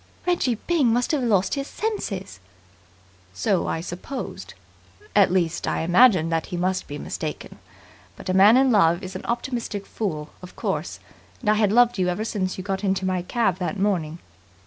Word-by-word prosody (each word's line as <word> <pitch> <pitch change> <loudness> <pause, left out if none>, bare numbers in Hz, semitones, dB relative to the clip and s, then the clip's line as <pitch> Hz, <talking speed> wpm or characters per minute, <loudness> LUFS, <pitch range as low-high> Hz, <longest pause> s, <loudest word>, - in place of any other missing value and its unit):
"Reggie 345 -9 +1
Byng 280 0 +1
must 245 +2 +1
have 300 -4 +1
lost 200 -6 +2
his 275 -1 -2
senses." 200 - -4 1.0
"So 195 - 0
I 160 - -2
supposed. 185 +10 -7 0.6
At 200 -4 +5
least, 175 -3 0
I - - 0
imagined 175 -1 +4
that 165 -1 -1
he 175 - -4
must 185 +1 -1
be 145 - -6
mistaken. - - -6 0.6
But - - -11
a 185 - 0
man 200 +5 +7
in 265 -1 +4
love 175 -3 +3
is 185 0 -7
an 185 - -6
optimistic 235 -4 -3
fool, 155 -8 -4
of 180 - -12
course, - - -3 0.4
and 210 -4 +2
I - - +5
had 210 -2 +2
loved 240 -1 +4
you 180 - +2
ever 180 +5 -1
since 190 -4 -2
you 185 - -5
got 195 +1 -3
into 190 -1 0
my 185 -1 0
cab 195 0 0
that 185 +3 -2
morning 180 -6 0
195 Hz, 180 wpm, -24 LUFS, 180-235 Hz, 1.0 s, man